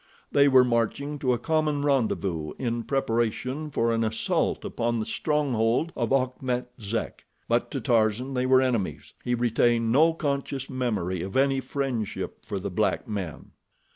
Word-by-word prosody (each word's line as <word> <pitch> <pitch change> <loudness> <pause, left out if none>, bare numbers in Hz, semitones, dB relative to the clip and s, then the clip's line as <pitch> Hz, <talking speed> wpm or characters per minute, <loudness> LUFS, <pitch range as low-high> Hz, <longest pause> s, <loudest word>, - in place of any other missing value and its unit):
They 140 0 +5
were 130 -2 +7
marching 125 +5 -1
to 130 -3 +1
a 125 - +2
common 150 +1 0
rendezvous 100 - 0
in 120 -2 -2
preparation 130 +3 -1
for 115 -5 +1
an 115 0 +1
assault 110 0 0
upon 120 0 -1
the 110 - -2
stronghold 145 -1 0
of 120 -1 -1
Achmet 130 -2 0
Zek; 110 +1 -4 0.2
but - - +1
to - - -3
Tarzan 115 +3 +1
they 125 0 0
were 130 0 +5
enemies—he 120 0 -2
retained 120 -1 +2
no 160 +6 +5
conscious 140 -3 -3
memory 105 -9 -1
of 95 +6 -3
any 135 0 +3
friendship 130 -6 -3
for - - -3
the - - -4
black - - 0
men. 95 -7 -5
125 Hz, 150 wpm, -26 LUFS, 115-135 Hz, 0.2 s, were